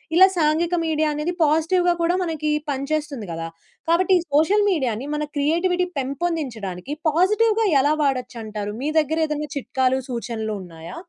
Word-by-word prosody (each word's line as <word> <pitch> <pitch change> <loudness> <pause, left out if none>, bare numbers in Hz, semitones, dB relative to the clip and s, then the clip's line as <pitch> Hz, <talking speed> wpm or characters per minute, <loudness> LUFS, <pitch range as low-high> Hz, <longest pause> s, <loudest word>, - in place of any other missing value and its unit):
ఇలా 375 +2 +8
సాంఘిక 325 +2 +2
మీడియా 310 -1 +1
అనేది 300 +4 -2
పాజిటివ్‌గా 325 +4 +3
కూడా 340 +1 +2
మనకి 315 -3 -2 0.2
పనిచేస్తుంది 280 -3 -2
గదా! 165 0 -4 0.4
కాబట్టి 370 +3 +3
ఈ - - -2
సోషల్ 390 +8 +4
మీడియా‌ని 260 - -1
మన 300 0 -1
క్రియేటివిటీ 345 +5 +1
పెంపొందించడానికి 270 - -3 0.2
పాజిటివ్‌గా 425 +7 +2 0.2
ఎలా 290 +3 +3
వాడొచ్చంటారు? 230 -6 -3
మీ 290 - -1
దగ్గరేదన్నా 305 -1 -1
చిట్కాలు, 260 -1 0
సూచనలు 230 -3 -3
ఉన్నాయా? 170 0 -10
300 Hz, 130 wpm, -22 LUFS, 255-335 Hz, 0.4 s, ఇలా